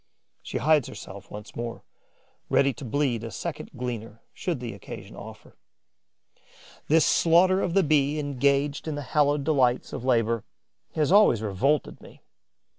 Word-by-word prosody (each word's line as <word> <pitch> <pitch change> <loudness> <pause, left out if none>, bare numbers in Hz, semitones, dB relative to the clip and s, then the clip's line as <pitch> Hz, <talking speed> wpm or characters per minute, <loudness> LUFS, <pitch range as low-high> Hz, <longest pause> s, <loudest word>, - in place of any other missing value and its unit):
She - - -5
hides 150 -3 +3
herself 100 0 -10
once 105 +1 -10
more, 115 0 -5 0.7
ready 140 -1 +3
to 145 - -11
bleed 125 -2 0
a 115 - -5
second - - -6
gleaner 115 -3 -6
should 170 -7 -3
the 120 -3 -5
occasion 100 - -10
offer. - - -12 1.3
This 160 +1 +4
slaughter 185 +3 +4
of 175 - -1
the 195 - +5
Bee 150 -1 +2
engaged 140 +1 0
in 155 - -2
the 145 - -4
hallowed 145 -1 +3
delights 130 -5 +1
of 125 - -5
labour 115 -3 +1 0.5
has 150 0 +1
always 195 - +5
revolted 130 +9 0
me. - - -16
140 Hz, 145 wpm, -26 LUFS, 115-150 Hz, 1.3 s, the